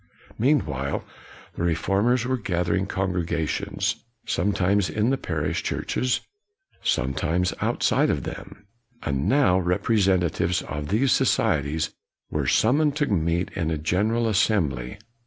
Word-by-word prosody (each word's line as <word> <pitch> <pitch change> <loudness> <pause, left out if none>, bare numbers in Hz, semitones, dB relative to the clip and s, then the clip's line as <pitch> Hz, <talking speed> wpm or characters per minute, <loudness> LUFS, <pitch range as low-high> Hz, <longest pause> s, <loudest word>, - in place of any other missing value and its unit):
Meanwhile, 105 - 0 0.5
the - - -6
reformers 100 +8 +1
were 130 +1 +1
gather 90 -7 -1
ing 95 +1 0
congregations, 90 -5 -1 0.3
sometimes 100 +1 +1
in 110 +4 +1
the 135 - +1
parish 75 -3 -2
churches, 125 0 -1 0.6
sometimes 85 +8 0
outside - - +2
of - - 0
them; 100 - -8 0.4
and 70 -1 -1
now 120 -10 +4
representatives 90 -2 +1
of 75 +1 -5
these 115 - +2
societies 75 +3 +1 0.4
were - - -1
summoned 145 +5 +3
to 150 -1 +1
meet 85 - 0
in 85 -3 -1
a 80 - -1
General 105 +9 +1
Assembly. 80 - +1
90 Hz, 120 wpm, -25 LUFS, 80-110 Hz, 0.6 s, now